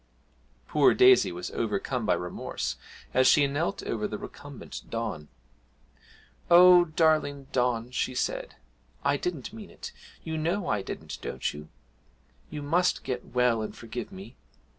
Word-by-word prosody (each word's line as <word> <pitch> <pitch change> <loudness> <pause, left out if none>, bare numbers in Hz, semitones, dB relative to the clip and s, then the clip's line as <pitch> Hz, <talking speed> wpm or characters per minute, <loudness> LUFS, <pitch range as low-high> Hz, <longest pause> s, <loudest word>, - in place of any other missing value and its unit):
Poor 150 -2 +4
Daisy 380 0 +6
was 90 +1 -6
overcome 110 +2 -2
by - - +4
remorse 90 0 -4 0.4
as 130 0 +4
she 150 -3 +6
knelt 150 +7 -2
over 105 -2 -2
the 105 - -5
recumbent 145 +3 -9
Don. 110 -10 -4 1.2
'Oh, 180 0 +8
darling 155 -3 +1
Don,' 125 -1 0
she 130 0 -2
said, - - -2 0.5
'I 140 - +3
didn't 170 - -4
mean 220 -3 -10
it - - -9 0.3
you 160 -1 -3
know 175 +5 -1
I 105 -2 0
didn't, - - -7
don't 65 - -3
you? 75 +1 -10 0.8
You 150 -2 -6
must 175 +5 +1
get 125 -2 -4
well 125 -2 +3
and 110 - -5
forgive 115 - -7
me! 190 +1 -11
140 Hz, 140 wpm, -28 LUFS, 115-165 Hz, 1.2 s, Oh